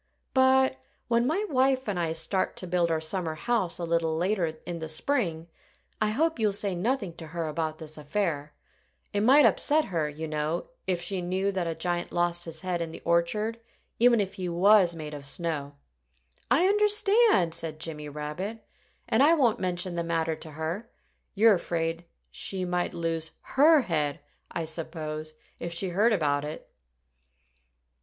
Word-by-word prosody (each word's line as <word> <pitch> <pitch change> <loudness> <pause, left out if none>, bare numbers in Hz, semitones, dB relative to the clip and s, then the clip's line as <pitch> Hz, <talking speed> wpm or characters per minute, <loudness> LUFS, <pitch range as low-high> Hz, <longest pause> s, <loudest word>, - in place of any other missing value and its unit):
"But 260 0 +4 0.3
when 235 +1 +3
my 370 +9 0
wife 265 - +2
and 195 -4 -1
I 165 -2 0
start 175 +4 -1
to - - -5
build 175 -1 +1
our 160 -1 +1
summer 160 0 -2
house 205 0 0
a 175 - -5
little 165 -1 0
later 180 0 +1 0.2
in 175 -1 -4
the 160 -1 -5
spring, 165 - -1 0.5
I 215 - +3
hope 315 +6 0
you'll 210 -2 +2
say 200 -1 0
nothing 200 0 -1
to 165 - -8
her 165 0 -3
about 155 0 -2
this 155 -1 -8
affair. 150 -2 -2 0.6
It 205 - +1
might 270 +7 +6
upset 305 +1 +3
her, 155 -3 0
you 155 +2 -6
know, 155 - -2 0.2
if 180 -2 0
she 185 +1 -2
knew 190 +3 0
that 185 -3 -2
a 165 - -2
giant 175 0 -2
lost 175 0 0
his 165 -1 -6
head 180 -2 -2
in 165 - -3
the - - -10
orchard 170 +7 +1 0.4
even 240 -1 +5
if 195 -1 -1
he 185 -2 -4
was 180 0 +5
made 155 -2 -7
of 140 -1 -7
snow." 145 -3 -3 0.7
"I 350 - +4
understand!" 420 - +4
said 155 -2 -3
Jimmy 150 -2 -5
Rabbit. 150 +10 -5 0.4
"And 220 - +2
I 310 +4 +6
won't 240 -7 +2
mention 180 0 -1
the 170 0 -2
matter 165 -1 0
to 155 0 -9
her. 165 +9 -4 0.5
You're 220 +2 +6
afraid 170 -2 -2 0.3
she 190 -2 -3
might 180 0 -1
lose 165 -1 -2 0.2
her 300 +2 +7
head, 150 - -1 0.3
I 165 - -3
suppose, 155 -1 -4 0.2
if 170 - -4
she 175 +3 -2
heard 205 +7 +3
about 145 -8 +1
it." 150 +1 -7
175 Hz, 170 wpm, -28 LUFS, 160-215 Hz, 0.7 s, her